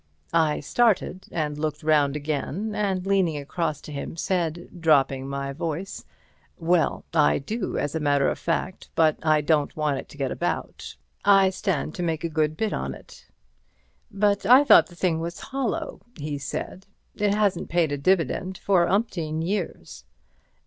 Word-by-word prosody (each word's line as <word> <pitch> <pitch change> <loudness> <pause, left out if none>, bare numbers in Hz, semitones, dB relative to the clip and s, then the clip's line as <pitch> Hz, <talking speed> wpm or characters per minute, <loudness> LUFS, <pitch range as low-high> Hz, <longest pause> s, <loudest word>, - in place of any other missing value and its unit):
I 160 -3 +2
started 190 0 +1
and 150 -2 -2
looked 155 -1 -3
round 150 -2 +3
again, 155 +8 -3
and 190 -3 -1
leaning 190 -6 +2
across 155 +1 -3
to - - -10
him, 145 +3 -6
said, 175 -1 -2
dropping 135 -4 +2
my 140 0 -3
voice: 165 +5 -5 0.5
"Well, 170 -1 +1
I 150 -3 +4
do, 210 - -3
as 145 - -2
a 160 - -1
matter 145 -2 +2
of - - -1
fact, 180 +2 -3
but 160 -2 +3
I 155 -2 +3
don't 150 -1 +1
want 150 -3 0
it - - -10
to - - -14
get 135 -3 -2
about. - - -4 0.3
I 195 -1 +5
stand 185 -5 -2
to - - -5
make 165 -2 -1
a 170 - -1
good 155 -1 0
bit 220 -1 -1
on - - -3
it." - - -16 0.8
"But 200 -1 +1
I 250 +7 +7
thought - - +7
the 175 - -16
thing 170 -2 0
was 170 +1 -5
hollow," 270 -4 -3 0.2
he 145 -1 -4
said; 165 +6 -6 0.3
"it 205 -1 +1
hasn't 205 -4 0
paid 170 -3 +1
a 145 - -1
dividend 185 +3 +1
for 180 -3 +2
umpteen 165 -7 -1
years." 190 +1 -4
165 Hz, 165 wpm, -25 LUFS, 150-190 Hz, 0.8 s, I